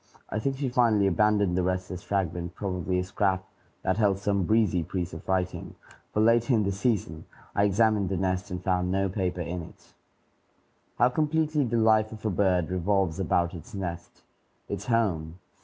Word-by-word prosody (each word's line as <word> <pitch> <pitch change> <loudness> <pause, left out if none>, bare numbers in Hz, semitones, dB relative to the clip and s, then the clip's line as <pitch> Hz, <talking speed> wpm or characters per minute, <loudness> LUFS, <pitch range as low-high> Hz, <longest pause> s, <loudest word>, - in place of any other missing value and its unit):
I 110 - -1
think 135 +4 -1
she 140 -1 -1
finally 115 -5 +3
abandoned 100 0 +2
the 95 - +2
restless 95 0 -2
fragment, 90 -3 -2
probably 90 -2 -2
a 90 - 0
scrap 95 0 0 0.4
that 95 - +1
held 100 -3 +3
some 100 -1 0
"breezy" 105 -4 +2
piece 90 +1 -4
of 80 +3 -9
writing, 95 -1 -2 0.4
for 105 - +1
later 120 +2 +4
in 110 - +2
the 100 - 0
season 95 -7 -1 0.3
I 100 - +3
examined 105 -1 +2
the 95 - -1
nest 95 0 -1
and 90 -1 -5
found 90 -1 +1
no 95 +1 +1
paper 90 -2 -2
in 85 +1 -4
it. 80 - -14 1.0
How 120 - +5
completely 155 +1 +1
the 120 0 0
life 110 -1 +3
of 110 0 -10
a 110 - +1
bird 90 -4 +1
revolves 95 -1 0
about 85 -1 +1
its 90 +6 -10
nest, 85 -3 -6 0.4
its 100 0 -5
home! 90 -9 0
95 Hz, 175 wpm, -27 LUFS, 90-110 Hz, 1.0 s, How